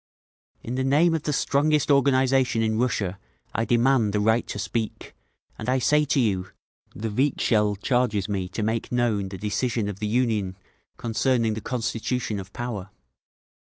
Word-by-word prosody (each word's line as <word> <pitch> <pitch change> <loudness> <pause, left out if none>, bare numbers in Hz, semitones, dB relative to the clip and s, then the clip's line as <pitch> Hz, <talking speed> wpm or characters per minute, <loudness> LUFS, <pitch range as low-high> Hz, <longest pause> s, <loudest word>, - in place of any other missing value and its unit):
"In 120 - -5
the 130 +1 -1
name 150 +6 +4
of 160 - 0
the 150 - -2
strongest 150 +1 +2
organisation 130 -3 +3
in 110 0 0
Russia 100 -6 -1 0.3
I 115 - 0
demand 120 -3 +3
the 105 - +1
right 110 +3 +2
to - - -5
speak, 110 +2 -4 0.5
and - - -3
I 130 - +3
say 150 +4 +3
to 140 - +1
you: 95 -6 +1 0.5
the 110 +1 -4
Vikzhel 105 -4 +2
charges 105 -2 0
me 95 -3 -2
to 105 +4 -3
make 110 +1 -2
known 115 -5 0
the 95 - -7
decision 105 +2 -1
of 100 -1 -5
the 105 - -2
Union 105 -5 0 0.4
concerning 115 -1 +1
the 110 - -5
constitution 115 -2 -2
of 95 +1 -9
Power. 110 -6 -5
115 Hz, 160 wpm, -25 LUFS, 105-130 Hz, 0.5 s, name